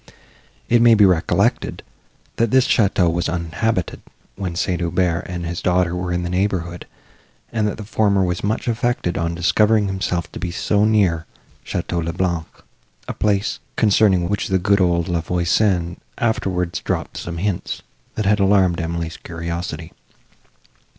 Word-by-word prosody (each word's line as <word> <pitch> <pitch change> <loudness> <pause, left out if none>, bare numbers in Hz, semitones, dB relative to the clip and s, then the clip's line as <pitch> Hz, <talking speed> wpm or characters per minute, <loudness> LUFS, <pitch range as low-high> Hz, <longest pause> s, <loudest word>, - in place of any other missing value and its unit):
It 120 0 +4
may 120 -1 +7
be 105 -1 +6
recollected, 90 -4 +1 0.5
that 115 0 +2
this 130 +2 +4
château 95 -6 +3
was 85 +1 -1
uninhabited, 85 +3 -2 0.3
when 95 -4 -4
St. 90 0 -1
Aubert 85 0 0
and 90 -1 -4
his 85 +1 -4
daughter 90 -1 +1
were 90 0 -3
in 90 0 -1
the 90 - -3
neighbourhood, 90 -2 -2 0.6
and 110 -2 0
that 105 - -3
the 110 - -6
former 100 -2 +2
was 90 -1 -2
much 105 +4 -1
affected 120 -6 0
on 85 +1 -1
discovering 105 +5 +3
himself 95 -3 -2
to - - -7
be 90 - -3
so 100 +4 +1
near 95 -7 +2 0.4
Château 85 -1 -2
le 85 +1 -3
Blanc, 85 -3 -1 0.6
a - - -3
place, 100 -1 0 0.2
concerning 100 -5 +3
which 100 +2 -1
the 95 - +2
good 100 +2 +2
old 85 -2 +2
La 85 -2 0
Voisin 90 +1 +1 0.2
afterwards 90 -6 -1
dropped - - -3
some 85 -1 -5
hints, 95 +1 -3 0.3
that 110 - -2
had 105 +2 +3
alarmed 95 -3 +3
Emily's 85 0 -3
curiosity. 85 -1 -5
90 Hz, 155 wpm, -20 LUFS, 85-105 Hz, 0.6 s, may